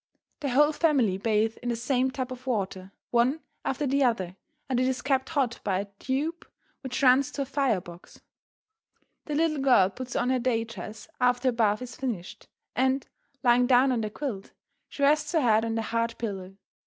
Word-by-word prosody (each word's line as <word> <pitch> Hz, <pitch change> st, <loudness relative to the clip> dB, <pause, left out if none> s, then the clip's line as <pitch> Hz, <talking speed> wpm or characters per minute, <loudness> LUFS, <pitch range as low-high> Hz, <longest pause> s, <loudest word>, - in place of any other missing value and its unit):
The 290 Hz, -3 st, -2 dB
whole 295 Hz, +4 st, +4 dB
family 270 Hz, -, +2 dB
bathe 220 Hz, +1 st, +1 dB
in 245 Hz, -, -3 dB
the 235 Hz, -, 0 dB
same 250 Hz, +2 st, +1 dB
tub 260 Hz, -1 st, -4 dB
of 255 Hz, +1 st, -9 dB
water, 195 Hz, -5 st, -2 dB, 0.2 s
one 250 Hz, +6 st, +2 dB, 0.2 s
after 270 Hz, +2 st, -1 dB
the 275 Hz, +1 st, +2 dB
other, 190 Hz, -8 st, 0 dB, 0.3 s
and 255 Hz, -2 st, 0 dB
it 255 Hz, -, +2 dB
is 260 Hz, -1 st, -1 dB
kept 265 Hz, -1 st, +1 dB
hot 270 Hz, -7 st, 0 dB
by 190 Hz, -2 st, 0 dB
a 200 Hz, -, -3 dB
tube 300 Hz, +6 st, -2 dB, 0.4 s
which 260 Hz, 0 st, -4 dB
runs 265 Hz, +2 st, +5 dB
to 280 Hz, -, -1 dB
a -, -, -7 dB
fire 270 Hz, -6 st, +1 dB
box. 175 Hz, 0 st, -13 dB, 1.1 s
The 300 Hz, -, -3 dB
little 310 Hz, -1 st, +1 dB
girl 245 Hz, -9 st, +4 dB
puts 250 Hz, +4 st, -7 dB
on 250 Hz, +1 st, +1 dB
her 260 Hz, -, +2 dB
day 235 Hz, -2 st, +1 dB
dress 220 Hz, -1 st, -9 dB
after 250 Hz, +1 st, +3 dB
her -, -, +2 dB
bath 220 Hz, -1 st, +1 dB
is 245 Hz, -2 st, -8 dB
finished, 225 Hz, -9 st, -5 dB, 0.3 s
and, 265 Hz, +1 st, +1 dB, 0.4 s
lying 245 Hz, 0 st, +4 dB
down 260 Hz, +1 st, +5 dB
on 240 Hz, -3 st, 0 dB
the 215 Hz, -, -2 dB
quilt, 215 Hz, -5 st, -5 dB, 0.4 s
she 280 Hz, -, -4 dB
rests 300 Hz, +4 st, +3 dB
her 320 Hz, -, +3 dB
head 225 Hz, -3 st, +4 dB
on 225 Hz, 0 st, -2 dB
the 225 Hz, -, -1 dB
hard 230 Hz, +1 st, -1 dB
pillow. 195 Hz, -4 st, -5 dB
250 Hz, 195 wpm, -27 LUFS, 225-270 Hz, 1.1 s, runs